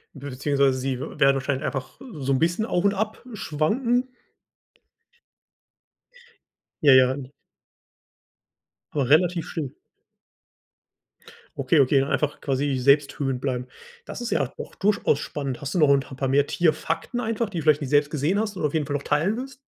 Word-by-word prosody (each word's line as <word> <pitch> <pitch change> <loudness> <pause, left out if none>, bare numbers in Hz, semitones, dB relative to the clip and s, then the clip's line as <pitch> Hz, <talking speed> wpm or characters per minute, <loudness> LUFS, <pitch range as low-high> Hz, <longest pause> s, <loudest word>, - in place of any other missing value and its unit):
Beziehungsweise 140 0 0
sie 130 0 -2
w 140 - -7
werden 135 -1 +4
vielleicht 135 +2 -2
einfach 135 -4 -5
so 135 -2 -1
'n 130 - +1
bisschen 175 +6 +1
auf 180 -5 0
und 200 - +4
ab 215 +3 -3
schwanken. 230 - 0 2.8
Ja, 140 - +8
ja. 130 0 +5 1.8
Aber 140 -4 0
relativ 170 +2 +3
still. 150 -6 -4 1.8
Okay, 140 +3 +2
okay, 135 +1 +3
dann 135 - -1
einfach 150 -1 -1
quasi 135 0 -1
selbsthöhend 140 0 +2
bleiben. 125 -2 -3 0.4
Das - - -7
ist 240 - -4
ja 150 - +2 0.2
auch - - -8
durchaus 200 -7 +1
spannend. 140 -3 -5
Hast 140 +3 -5
du - - +2
noch 150 -3 +5
'n 140 - +3
ta - - -13
'n - - -19
paar 135 0 -1
mehr 140 +2 +2
Tierfakten 165 +7 -1
einfach, 225 -1 -1
die 175 - -5
du - - -5
vielleicht 155 -1 +4
nie 140 - -3
selbst 145 +1 +3
gesehen 155 +7 0
hast 210 -2 -3
und - - -4
auf 150 - -1
jeden 155 -3 0
Fall 145 - -2
noch 140 - -3
teilen 165 +10 +1
willst? 270 +2 -7
145 Hz, 170 wpm, -24 LUFS, 135-175 Hz, 2.8 s, Ja